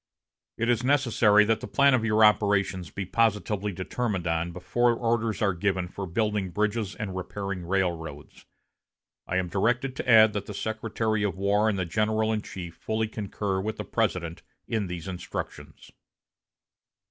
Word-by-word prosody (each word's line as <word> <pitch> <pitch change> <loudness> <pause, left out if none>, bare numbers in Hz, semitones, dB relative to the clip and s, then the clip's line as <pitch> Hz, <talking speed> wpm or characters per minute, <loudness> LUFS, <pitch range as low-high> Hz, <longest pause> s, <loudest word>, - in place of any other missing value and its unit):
It 115 - 0
is 120 0 +2
necessary 120 -6 +4
that 110 +1 +1
the - - -7
plan 140 +7 +4
of 125 -3 +2
your 110 -1 +5
operations 100 -4 +2
be 100 +4 -5
positively 105 -1 0
determined 95 0 -3
on 85 +1 -1
before 120 +7 +1
orders 115 -2 0
are 100 -2 +2
given 95 0 -1
for 95 +2 -6
building 105 +1 -1
bridges 105 +2 -1
and 100 -4 -5
repairing 95 0 -4
railroads. 85 -6 -3 0.8
I 90 - -1
am 95 -1 0
directed 120 +8 0
to - - -4
add 110 -2 +7
that 100 -1 -4
the 105 - -6
Secretary 110 0 -2
of 100 -2 -1
War 100 +2 +2
and 105 - -1
the 95 - -1
general 110 +4 +1
in 110 - -1
chief 85 -5 -8
fully 110 0 -1
concur 100 -2 -3
with 110 +2 -3
the - - -5
President 85 -2 -1 0.3
in 110 -3 -1
these 90 0 -6
instructions." 90 -2 -7
105 Hz, 160 wpm, -27 LUFS, 95-110 Hz, 0.8 s, add